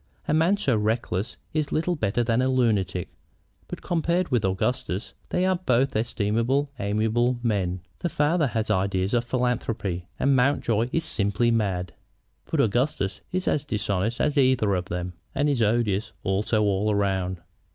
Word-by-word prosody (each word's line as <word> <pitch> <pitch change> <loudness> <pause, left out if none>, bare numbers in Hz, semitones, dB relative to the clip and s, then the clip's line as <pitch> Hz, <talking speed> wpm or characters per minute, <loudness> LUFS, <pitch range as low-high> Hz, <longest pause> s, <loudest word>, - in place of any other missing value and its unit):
A - - +1
man 165 +6 +3
so 140 - +1
reckless 110 -1 -1 0.2
is 155 -2 -1
little 175 +3 0
better 115 -3 0
than 115 +1 +1
a 130 - +2
lunatic. 105 -9 +1 0.6
But - - -7
compared 170 +1 0
with 120 -5 +1
Augustus 95 +2 -1 0.2
they 180 - +1
are 185 -1 +2
both 135 -6 +1
estimable, 115 +5 0
amiable 110 +4 +1
men. 95 -6 0 0.2
The 175 - -1
father 155 +1 +2
has 110 -2 -1
ideas 95 +1 0
of 120 -1 +2
philanthropy, 115 -8 -2
and 140 0 +3
Mountjoy 125 -3 +2
is 165 - 0
simply 120 -4 +1
mad. 95 -6 -1 0.6
But - - +2
Augustus 115 -3 0
is 185 0 -2
as 145 - +1
dishonest 105 -3 -1
as 150 -1 +2
either 130 -6 +3
of 90 -1 -1
them, 90 0 -4 0.2
and 145 - +2
is 140 -5 +1
odious 110 -2 +1
also 105 +3 +1
all 105 +1 +1
round." 95 -2 0
115 Hz, 155 wpm, -25 LUFS, 100-135 Hz, 0.6 s, man